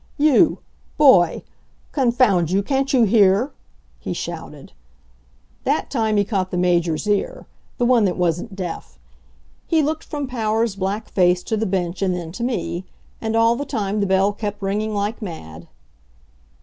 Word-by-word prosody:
"You. 305 +2 +4 0.4
boy 195 - +5 0.5
confound 235 - +2
you, 195 +2 +1
can't 270 +4 0
you 255 -3 +4
hear?" 205 +3 +4 0.5
he - - -4
shouted. 165 -4 -7 0.9
That - - -1
time 220 -5 +1
he 205 - +4
caught 190 -3 -1
the 180 - -3
Major's 175 -1 +1
ear 210 - -1 0.3
the 245 - +1
one 240 -3 +4
that 180 - -1
wasn't 180 +4 -1
deaf. 165 - -6 0.7
He 320 -2 +2
looked 310 +2 -2
from 290 -2 -4
Powers' 225 -3 -1
black 200 +2 -3
face 180 -1 +2
to 220 - -2
the 220 0 -1
bench 180 -1 -2
and 185 -2 +1
then 170 -2 -6
to 235 +7 -6
me. 225 -7 -2 0.4
And 225 0 -2
all 230 +1 +4
the 280 - -3
time 215 -7 -2
the 200 - +1
bell 190 +2 +2
kept 205 0 -5
ringing 210 +2 -1
like 205 +3 -2
mad. 85 - -8
205 Hz, 160 wpm, -21 LUFS, 180-235 Hz, 0.9 s, boy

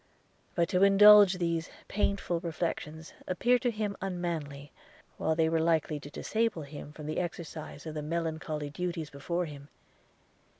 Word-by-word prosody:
But 170 -2 +2
to 180 - +1
indulge 200 0 +8
these 170 -1 -1 0.2
painful 200 -4 0
reflections 165 -1 -4
appeared 240 +7 +2
to 250 - +1
him 210 -3 -2
unmanly, 165 -7 -4 0.5
while 160 - 0
they 160 0 +3
were 165 0 +1
likely 160 -2 +1
to 145 - -10
disable 220 +1 -1
him 145 0 -9
from 150 0 -10
the 155 - -2
exercise 165 -3 -6
of 160 - -5
the 155 - -4
melancholy 160 -2 -3
duties 170 -1 -4
before 170 +5 -2
him. 145 -2 -10
165 Hz, 145 wpm, -30 LUFS, 155-185 Hz, 0.5 s, indulge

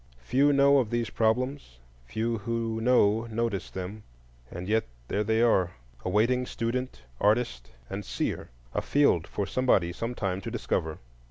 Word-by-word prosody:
Few 140 - +3
know 140 0 +5
of 120 -5 0
these 120 -2 -1
problems, 120 - 0 0.3
few 115 - -1
who 115 0 -2
know 115 -2 +4
notice 110 -4 -2
them; 95 +3 -6 0.5
and 90 +2 -6
yet 110 +2 +2 0.2
there 105 - +1
they 110 +2 +2
are, 95 -6 +3 0.3
awaiting 120 +7 +2
student, 115 - -3 0.2
artist, 105 - +1 0.2
and 100 +7 -5
seer,—a - - -4
field 140 - +3
for 100 - -2
somebody 95 -7 +2
sometime 100 -4 -2
to - - -5
discover. 80 -1 -2
110 Hz, 140 wpm, -28 LUFS, 95-120 Hz, 0.5 s, know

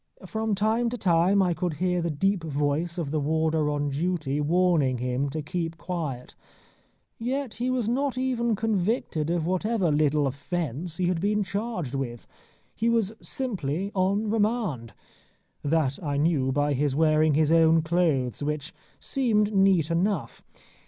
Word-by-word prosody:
From 220 +2 -1
time 220 +4 +1
to 245 - -4
time 185 +1 +3
I 180 -2 +1
could 175 -1 -2
hear 180 +2 0
the 170 - -1
deep 190 +4 0
voice 150 +3 -1
of 155 -5 -3
the 155 - 0
warder 160 +1 +1
on 145 0 -1
duty 150 -1 -1
warning 160 -5 +2
him 125 +3 -1
to 155 +2 -4
keep 165 +1 -3
quiet. 155 -8 -5 0.9
Yet 255 +1 -2
he 250 - +1
was 255 -4 0
not 265 +2 0
even 240 -3 0
convicted 205 - -1
of 170 -2 0
whatever 185 0 0
little 150 0 +2
offence 155 +3 -3
he 185 - 0
had 175 -2 0
been 210 +1 +1
charged 195 - -3
with. 120 -4 -4 0.5
He 230 +1 0
was 225 -3 +1
simply 195 - -3
on 200 +3 +1
remand. 210 - -1 0.7
That 145 -2 0
I 145 -2 -1
knew 145 -4 +2
by 145 +2 +1
his 140 0 0
wearing 155 -1 +3
his 155 0 +3
own 165 -1 +5
clothes, 160 -7 0
which 150 +3 -3 0.3
seemed 215 -6 +1
neat 190 -5 +3
enough. 180 +1 -1
170 Hz, 150 wpm, -26 LUFS, 150-205 Hz, 0.9 s, own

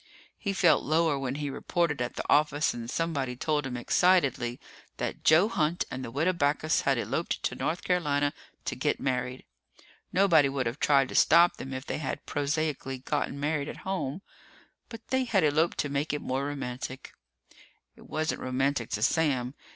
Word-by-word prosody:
He 200 - -2
felt 175 -5 +4
lower 155 -1 +2
when 135 -1 -3
he 145 -1 -3
reported 160 -2 -1
at 120 - -3
the - - -3
office 150 0 +3
and 115 -1 -6
somebody 140 -5 -2
told 150 +1 -1
him 125 -2 -4
excitedly 130 -5 +2 0.4
that - - -4
Joe 160 +6 +6
Hunt 170 -5 0
and 130 - -5
the - - -5
Widow 155 +9 +1
Backus 155 -1 +1
had - - +1
eloped - - -2
to - - 0
North 170 +2 -2
Carolina 145 -5 +1 0.3
to - - -2
get - - 0
married. 125 -1 -2 0.7
Nobody 170 -7 +4
would 135 -2 -2
have 120 +5 -3
tried 135 -3 +3
to - - -7
stop 170 +2 +5
them 135 - -7
if 130 +1 -5
they - - -3
had 145 - -4
prosaically 145 -2 -2
gotten 140 +1 -2
married 150 0 -1
at - - -7
home, 190 -3 -3 0.7
but 230 -1 -10
they 260 0 +1
had 205 -7 +2
eloped 155 +3 +2
to - - 0
make 140 +2 -1
it 150 - -2
more 135 +2 -1
romantic. 130 -2 -6 0.8
It - - -17
wasn't 155 0 -2
romantic 130 -1 -1
to 105 - -3
Sam. 130 -5 +1
145 Hz, 175 wpm, -28 LUFS, 130-160 Hz, 0.8 s, Joe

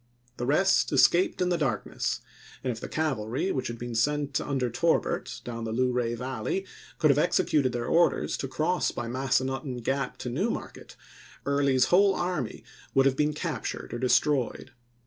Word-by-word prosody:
The 120 - -3
rest 190 +7 +3
escaped 180 +1 +4
in 180 - +1
the 175 -1 +1
darkness; 130 -9 -1 0.4
and 130 - 0
if 115 - -6
the - - -7
cavalry 145 - -1
which 130 -1 -2
had 120 - -5
been 120 0 -6
sent 145 +3 0
under 135 -3 -1
Torbert, 165 +7 0
down 115 -1 -5
the 115 - -3
Luray 125 0 0
Valley, 130 - -3 0.3
could 155 -3 +4
have 140 - +2
executed 145 -3 +2
their 120 -1 -3
orders 170 +5 +2
to 135 - -3
cross 155 +7 0
by 120 - -4
Massanutten 130 +1 -1
Gap 135 +3 -1
to 125 - -5
New 120 - 0
Market, - - -6 0.5
Early's 140 -2 +3
whole 195 +1 +5
army 175 -10 -3 0.3
would 135 0 +5
have 135 -1 +3
been 150 +2 +1
captured 150 - -4
or 120 - -3
destroyed. 130 0 +1
135 Hz, 165 wpm, -28 LUFS, 120-150 Hz, 0.5 s, whole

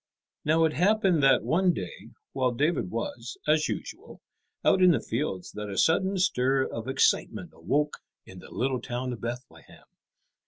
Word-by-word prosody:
Now 160 +2 +3
it 160 -1 +2
happened 190 -2 +2
that 135 -1 +4
one 180 +2 +2
day 90 - -7 0.2
while 130 -1 +1
David 125 - 0
was, 115 +2 -5
as 155 0 +3
usual, 360 +8 -7 0.5
out 190 - +4
in 185 - +7
the 170 - +3
fields 115 -7 -3
that 105 0 -6
a 100 - -6
sudden 190 +4 +2
stir 135 -8 +2
of 115 +1 -6
excitement 130 0 +1
awoke 145 - -1 0.3
in 95 - -12
the - - -13
little 130 -1 -1
town 125 0 -4
of 120 - -9
Bethlehem. 120 +2 -8
135 Hz, 160 wpm, -27 LUFS, 120-165 Hz, 0.5 s, in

